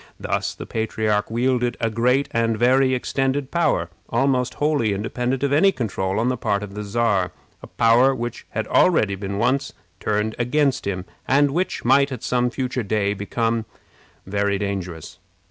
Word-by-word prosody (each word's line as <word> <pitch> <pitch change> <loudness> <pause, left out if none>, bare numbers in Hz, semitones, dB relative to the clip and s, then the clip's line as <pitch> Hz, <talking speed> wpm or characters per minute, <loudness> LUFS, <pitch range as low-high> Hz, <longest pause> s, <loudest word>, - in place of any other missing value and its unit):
Thus - - -2
the - - -8
patriarch 110 -2 -1
wielded 120 +1 0
a 115 -1 0
great 125 +5 +2
and 115 -1 +1
very 130 +2 +3
extended 135 +2 -1
power, 90 - +1 0.2
almost 125 +1 +1
wholly 145 -8 +1
independent 125 +6 -2
of 140 0 +1
any 195 +7 +5
control 95 - -2
on 115 - +1
the 130 0 0
part 100 -2 -1
of 100 -1 -8
the 105 +1 -5
Czar 105 -3 +1 0.3
a - - -10
power 120 +4 +4
which 120 -1 -5
had 110 - -3
already 110 - +3
been 100 0 -4
once 135 +6 0 0.3
turned 105 +3 -1
against 135 0 +1
him, 90 -2 -3 0.2
and 145 +1 +3
which 180 +6 -2
might 140 0 +4
at 125 -4 -6
some 125 0 +1
future 130 0 -2
day 100 -1 0
become 115 +3 -1 0.6
very 100 +1 0
dangerous. 95 -5 -5
115 Hz, 165 wpm, -22 LUFS, 105-130 Hz, 0.6 s, any